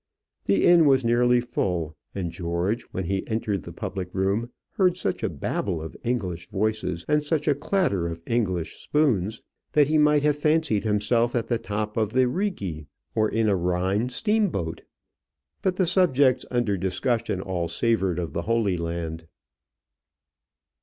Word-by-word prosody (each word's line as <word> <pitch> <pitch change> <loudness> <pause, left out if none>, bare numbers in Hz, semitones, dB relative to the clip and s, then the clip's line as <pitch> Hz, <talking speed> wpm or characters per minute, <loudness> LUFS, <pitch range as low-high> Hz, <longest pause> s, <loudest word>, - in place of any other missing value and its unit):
The 100 -1 +3
inn 170 -3 +6
was 135 -3 +4
nearly 120 +1 +4
full, 90 -10 -2 0.2
and 90 -4 -3
George, 85 +6 -1
when 95 - -3
he 95 +2 -1
entered 110 -3 -1
the - - -9
public 95 -2 -5
room, 100 +5 0 0.2
heard 185 -5 +2
such 95 - -2
a - - 0
Babel 90 -5 -2
of 80 0 -7
English 95 -8 -2
voices, 105 -4 -1
and 150 0 +2
such 150 0 -1
a 150 - +5
clatter 145 - 0
of 85 0 -6
English 95 -8 -1
spoons 115 -9 +1 0.3
that 145 -1 +4
he 155 0 +3
might 150 -1 +4
have 150 -1 +3
fancied 150 -9 +1
himself 115 +3 +1
at 120 - -1
the 120 -2 +1
top 105 0 -3
of 110 -1 0
the 130 0 +4
Righi 105 - -3 0.3
or 110 -1 +2
in 110 0 +1
a 100 - +3
Rhine 95 +6 0
steamboat. 170 - 0 0.8
But 185 -2 0
the 185 - +2
subjects 145 -8 +3
under 120 -5 0
discussion 95 +3 -1
all 90 -3 -2
savoured 95 -4 +1
of 85 -5 -3
the 85 - -1
Holy 110 -2 +1
Land. 85 -1 -4
110 Hz, 160 wpm, -25 LUFS, 90-130 Hz, 0.8 s, inn